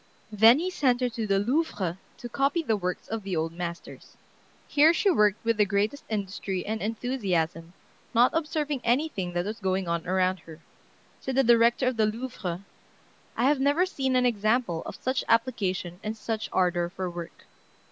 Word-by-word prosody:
Then 220 +4 +7
he 360 +4 -2
sent 255 -8 +2
her 250 - +1
to 230 -2 -4
the 195 -1 +2
Louvre 205 - -1 0.2
to 240 - -7
copy 275 +7 0
the 225 -7 +1
works 180 -3 -4
of 225 0 -4
the 195 -2 -4
old 160 +1 -1
masters. 170 0 -7 0.5
Here 310 +3 +5
she 395 - +3
worked 210 - +2
with 230 -1 +2
the 210 - +5
greatest 205 +8 -1
industry 195 -3 -3
and 220 +1 -3
enthusiasm, 195 -8 -2 0.4
not 245 +1 +4
observing 300 -4 -1
anything 235 - 0
that 175 0 -1
was 215 +2 -5
going 190 -2 -1
on 170 -1 -2
around 185 0 +1
her. 160 -1 -13 0.6
Said 265 - -4
the 270 - +4
director 235 +1 +4
of 255 -2 0
the 215 -1 +3
Louvre, 210 -6 -5 0.7
"I 235 - +1
have 280 +2 +3
never 285 +6 +3
seen 265 -8 -1
an 250 0 +3
example 215 -5 +1
of - - -6
such 255 0 -2
application 195 -7 0
and 215 +1 -4
such 220 0 -4
ardor 175 -2 +1
for 185 +1 -4
work." 175 -1 -8
220 Hz, 175 wpm, -27 LUFS, 185-255 Hz, 0.7 s, Then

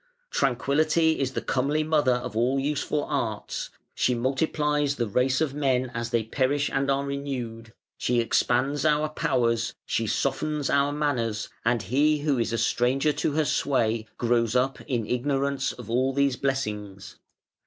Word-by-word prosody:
Tranquillity 155 +5 +2
is 135 -1 -1
the - - -3
comely 145 +4 0
mother 150 -5 +2
of 120 -3 -5
all 125 +4 +2
useful 145 +1 -1
arts; 115 -8 -3 0.2
she 125 - +1
multiplies 145 +3 0
the 120 - -1
race 130 +6 +1
of 150 -4 0
men 130 -3 0
as 115 0 -3
they 115 -1 +1
perish 140 +5 0
and 135 0 0
are 140 0 +1
renewed; 125 -5 -5 0.3
she 120 -1 +1
expands 125 +4 +1
our 155 0 +2
powers, 115 -6 0
she 115 - -1
softens 145 +4 -1
our 140 0 +3
manners, 120 -8 -1
and 115 -1 +1
he 145 +9 +2
who 145 -4 +1
is 115 0 0
a 115 - 0
stranger 125 +6 +1
to 145 - -1
her 155 0 +1
sway 115 -6 0
grows 115 -1 +1
up 130 +2 +1
in 120 -6 -1
ignorance 135 +2 0
of 125 - -10
all 130 +3 +1
these 140 -1 +2
blessings. 105 -8 -3
135 Hz, 155 wpm, -26 LUFS, 120-145 Hz, 0.3 s, our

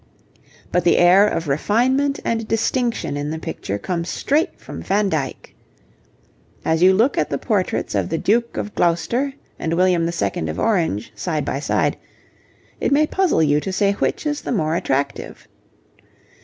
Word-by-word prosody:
But 180 - +1
the 170 - +4
air 185 +4 +6
of 165 -5 -2
refinement 255 - +1
and 225 -1 -1
distinction 230 - 0
in 145 +1 -3
the 160 - -3
picture 100 -9 -4
comes 170 - -3
straight 300 +4 0
from - - -8
Van 200 +1 +1
Dyck. 145 -6 -4 1.1
As 160 +1 +1
you 185 +1 +7
look 225 +8 +2
at - - 0
the - - -1
portraits - - -1
of - - 0
the - - -1
Duke 235 +3 0
of 210 - -4
Gloucester 205 +11 +1 0.3
and 165 +1 -1
William 175 -2 +2
II. 100 - -2
of 80 - -4
Orange 165 - 0
side 155 -5 -2
by 135 - -2
side, 145 - 0 0.8
it - - 0
may 295 +2 +4
puzzle 360 - +1
you 145 -1 +3
to 190 - -4
say 200 +1 +2
which 200 - -2
is 295 -1 -1
the - - -4
more 160 -8 0
attractive. 140 -3 -2
180 Hz, 165 wpm, -21 LUFS, 155-230 Hz, 1.1 s, you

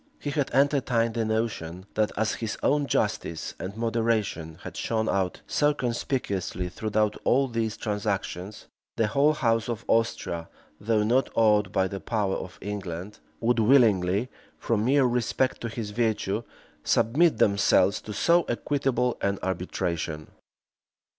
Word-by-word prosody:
He 145 - -4
had 145 -2 0
entertained 130 -5 +2
the 115 -1 0
notion, 105 -6 -2
that, 105 -1 +1
as 110 0 +1
his 110 -2 -4
own 145 0 +2
justice 80 - -1
and 100 +3 -6
moderation 115 -8 -1
had - - -8
shone 110 -1 -1
out 95 -2 -1
so 150 0 +2
conspicuously 115 -8 -2
throughout 105 +2 0
all 135 +2 +3
these 115 -3 -2
transactions, 105 -2 -3 0.3
the 115 - +3
whole 140 +7 +3
house 115 -5 +1
of 115 -1 -4
Austria, 85 -7 0 0.3
though 105 0 +1
not 125 +5 +2
awed 105 -3 +3
by 95 -1 +2
the 100 +1 -5
power 105 -4 -1
of 90 -1 -7
England, 100 -1 -5 0.2
would 120 0 +2
willingly, 110 -3 +4 0.3
from 110 -2 0
mere 135 +1 +4
respect 125 +1 0
to 115 - -3
his 110 -2 -5
virtue, 110 -2 0 0.4
submit 150 +4 +3
themselves 100 -2 +3
to 110 - -8
so 170 - +3
equitable 125 -1 0
an 100 0 0
arbitration. 85 -4 -3
110 Hz, 140 wpm, -26 LUFS, 100-120 Hz, 0.4 s, willingly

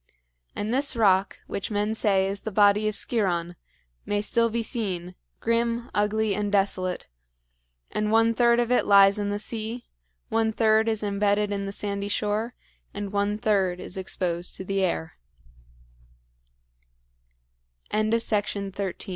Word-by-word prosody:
And 215 +3 -2
this 275 0 +1
rock, 195 -4 +3
which 200 - -4
men 210 0 0
say 200 -3 +2
is 195 +1 -3
the 220 - -5
body 205 +1 +4
of 215 - -1
Sciron, 180 -6 -1 0.5
may 205 - -1
still 230 +3 +1
be 230 +1 -1
seen, 185 -7 -3 0.3
grim, 235 +1 0
ugly, 210 0 +1
and 205 +1 -2
desolate; 190 -2 0 0.8
and 210 0 -1
one 225 +1 +4
third 235 0 +4
of 240 0 0
it 250 - +2
lies 200 0 +6
in 205 0 -1
the 205 - -1
sea, 225 +2 -4 0.4
one 225 0 +1
third 220 0 +3
is 220 -1 -1
embedded 205 0 +1
in 200 -1 -2
the - - -4
sandy 200 0 -3
shore, 210 +3 -1 0.4
and 205 0 -5
one 205 +1 0
third 195 -4 +1
is - - -7
exposed 180 -2 -3
to 190 - -5
the 195 +1 -1
air. 170 -3 -2 2.8
IV. 215 0 +1
WRESTLER 225 -2 +2
AND 205 - -6
WRONG - - -5
DOER. 190 -1 -3
205 Hz, 155 wpm, -26 LUFS, 195-220 Hz, 2.8 s, lies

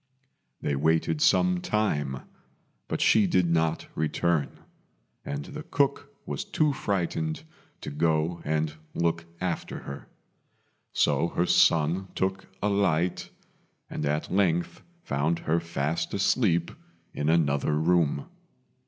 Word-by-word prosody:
They 70 - 0
waited 80 +1 +1
some 90 -1 +4
time, 75 -12 -1 0.7
but - - -2
she 105 -3 +5
did 90 0 +3
not 80 -1 +1
return, 80 0 0 0.7
and 70 0 -4
the - - -7
cook 140 0 0 0.2
was - - -3
too 150 -2 +1
frightened 85 -8 -2 0.4
to - - -6
go 80 +2 0
and 75 0 0 0.2
look 85 0 0
after 90 -2 -3
her; 70 +1 -8 0.8
so 85 - +2
her 85 +1 0
son 85 +3 +3
took 95 0 -1 0.2
a - - +3
light, 90 -4 +1 0.6
and - - -3
at 75 +4 -1
length 90 -3 +1 0.2
found 75 +4 0
her 85 0 0
fast 85 0 -2
asleep 95 -4 +2 0.4
in 75 +1 -1
another 75 -2 +2
room. 80 -3 +2
85 Hz, 120 wpm, -27 LUFS, 75-90 Hz, 0.8 s, she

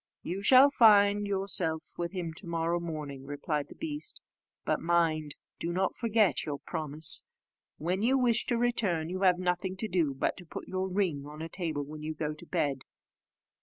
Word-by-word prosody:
"You 185 +3 -4
shall 260 +6 +7
find 205 -4 +5
yourself 190 -5 0
with 170 0 -3
him 175 -4 -4
to 195 - -4
morrow 170 +1 -1
morning," 150 -5 -6
replied 145 +1 -3
the - - -13
beast; 300 -2 -3 0.5
"but - - 0
mind, 165 -3 +1 0.2
do 170 - -2
not 185 +2 0
forget 225 -4 +2
your 145 -2 -4
promise. 155 +2 +2 0.5
When 180 +5 -2
you 255 +4 +3
wish 240 -3 +2
to 240 - +1
return, 200 -9 0
you 185 +1 -4
have 185 -2 +4
nothing 180 +1 -2
to 220 - -2
do 165 -8 0
but 135 - -1
to 180 - -9
put - - -8
your 190 0 -2
ring 175 -7 -1
on 150 +2 -8
a 165 - -6
table 160 -5 -3
when 150 +1 -9
you 155 +1 -4
go 155 0 -3
to 150 - -11
bed. 135 -3 -1
175 Hz, 185 wpm, -30 LUFS, 155-200 Hz, 0.5 s, shall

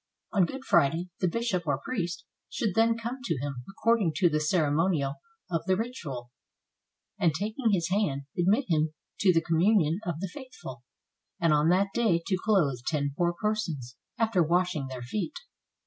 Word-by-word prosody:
On 190 -5 +4
Good 270 0 -7
Friday 170 +1 +3
the 185 - +2
bishop 185 -3 -1
or 145 -2 +2
priest 180 -8 -3 0.2
should 220 -8 -1
then 225 +2 +3
come 235 +3 -4
to 165 - -1
him 140 0 -4
according 215 -4 +2
to 180 -1 +4
the 155 -1 +1
ceremonial 155 -2 +1 0.3
of 165 - +1
the 185 0 +3
ritual, 150 - -5 0.9
and 165 -3 +3
taking 220 - -1
his 175 -5 +1
hand, 170 -9 0
admit 200 +10 +2
him 155 -2 +1 0.2
to 195 - +5
the 165 -2 +2
communion 170 0 +3
of 170 -6 -3
the 190 -1 -4
faithful, 255 - -9 0.6
and 165 -2 +3
on 150 +2 +3
that 195 +2 +2
day 215 -8 +2
to 190 -2 +1
clothe 165 - +2
ten 145 -3 0
poor 175 +1 +1
persons, 170 - -2 0.2
after 225 -5 +2
washing 170 -3 +1
their 130 -2 -6
feet. 210 - -3
175 Hz, 165 wpm, -28 LUFS, 155-215 Hz, 0.9 s, to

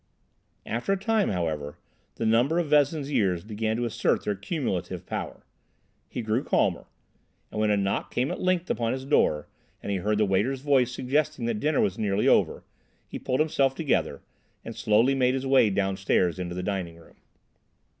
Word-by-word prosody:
After 120 - -1
a - - 0
time, 215 +1 +1
however, 80 -5 -3 0.4
the 115 - -3
number 120 +9 +3
of 175 -3 0
Vezin's 145 0 +2
years 95 -9 +1
began 110 +1 -2
to 120 - -1
assert 115 - 0
their 105 - +1
cumulative 100 - -3
power; - - -6 0.6
he 120 - -4
grew 110 +4 0
calmer, - - +1 0.7
and - - -4
when 110 - +2
a 105 - +3
knock 100 0 -1
came 125 +3 0
at - - -5
length 185 -1 0
upon 115 0 0
his 130 0 -5
door 75 - +2 0.4
and - - -3
he 100 - 0
heard 105 +3 0
the 105 - +3
waiter's 105 +8 0
voice 135 -4 +2
suggesting 140 +1 -1
that 115 -2 -1
dinner 150 +5 +1
was 95 -1 0
nearly 105 -1 +1
over, - - +3 0.4
he - - -7
pulled 130 +2 0
himself 135 -4 +1
together 150 -2 -1 0.4
and - - -7
slowly 110 +6 +3
made 130 -1 +2
his 135 0 -3
way 135 -5 +4
downstairs 95 -2 0
into 90 -1 -4
the 90 - -4
dining 90 -4 -3
room. 85 - -19
115 Hz, 180 wpm, -26 LUFS, 100-135 Hz, 0.7 s, way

